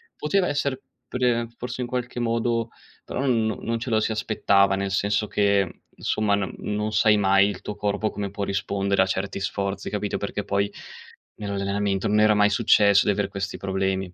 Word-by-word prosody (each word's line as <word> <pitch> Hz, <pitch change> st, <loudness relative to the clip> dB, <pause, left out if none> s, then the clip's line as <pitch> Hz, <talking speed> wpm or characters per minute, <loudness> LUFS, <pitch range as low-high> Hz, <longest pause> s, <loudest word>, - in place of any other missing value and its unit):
Poteva 180 Hz, +4 st, +1 dB
essere 140 Hz, -2 st, -1 dB, 0.3 s
pre 120 Hz, -2 st, 0 dB
forse 125 Hz, +1 st, -5 dB
in 125 Hz, -, -2 dB
qualche 125 Hz, 0 st, -4 dB
modo, 115 Hz, 0 st, 0 dB, 0.3 s
però -, -, -5 dB
non 110 Hz, -4 st, +1 dB
non 115 Hz, 0 st, -1 dB
ce 120 Hz, -, -5 dB
lo 110 Hz, -2 st, +3 dB
si 110 Hz, -, 0 dB
aspettava, 100 Hz, -2 st, +2 dB
nel 100 Hz, 0 st, -2 dB
senso 100 Hz, +2 st, 0 dB
che, 100 Hz, -1 st, +2 dB
mhmm, 85 Hz, -, -10 dB, 0.3 s
insomma, 105 Hz, -2 st, +1 dB
no 100 Hz, -2 st, -2 dB
non 105 Hz, +1 st, -2 dB
sai 105 Hz, 0 st, +4 dB
mai 100 Hz, -1 st, +4 dB
il 100 Hz, -, -5 dB
tuo 105 Hz, -, -6 dB
corpo 105 Hz, +1 st, -1 dB
come 100 Hz, -1 st, -5 dB
può 100 Hz, -, -4 dB
rispondere 100 Hz, 0 st, 0 dB
a -, -, +4 dB
certi 95 Hz, +1 st, -3 dB
sforzi, 100 Hz, 0 st, -3 dB
capito, 105 Hz, -1 st, -2 dB
perché 100 Hz, 0 st, -4 dB
poi 100 Hz, 0 st, 0 dB, 0.7 s
nell'allenamento 100 Hz, -1 st, -1 dB
non 105 Hz, +1 st, +3 dB
era 105 Hz, 0 st, +5 dB
mai 105 Hz, 0 st, +4 dB
successo 100 Hz, -2 st, +4 dB
di -, -, +3 dB
aver 100 Hz, 0 st, -1 dB
questi 100 Hz, 0 st, -4 dB
problemi. 95 Hz, -1 st, -2 dB
105 Hz, 185 wpm, -24 LUFS, 100-110 Hz, 0.7 s, era